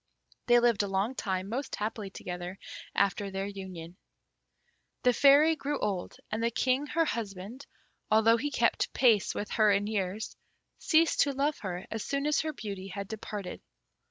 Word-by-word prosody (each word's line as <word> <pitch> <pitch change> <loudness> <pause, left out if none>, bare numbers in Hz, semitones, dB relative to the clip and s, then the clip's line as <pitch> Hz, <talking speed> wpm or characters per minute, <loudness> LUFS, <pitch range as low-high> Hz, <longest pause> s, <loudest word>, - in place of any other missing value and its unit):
They 240 0 +6
lived 235 -3 +3
a 205 - -1
long 195 +5 0
time 190 -6 -2
most 255 +7 -3
happily 210 -1 -4
together 180 0 -6 0.4
after 200 0 +1
their 195 0 -3
union. 185 -4 -8 1.1
The 250 - +5
Fairy 285 +5 +6
grew 290 -1 -2
old, 195 -4 -3
and 215 +1 -1
the 230 - +3
King, 255 +4 +1
her 330 +1 +1
husband, 220 0 -5 0.4
although 220 +1 +5
he 290 +5 -2
kept - - +1
pace 225 -6 +3
with 205 - -4
her 215 -2 +4
in 200 0 +2
years, 205 0 -3 0.4
ceased 325 +1 +3
to 280 - +3
love 280 +2 0
her 185 -2 -5
as 225 -1 -3
soon 280 0 -2
as 300 0 +2
her 315 - -2
beauty 200 -7 -6
had 195 +1 -6
departed. 210 -3 -6
215 Hz, 165 wpm, -30 LUFS, 195-260 Hz, 1.1 s, They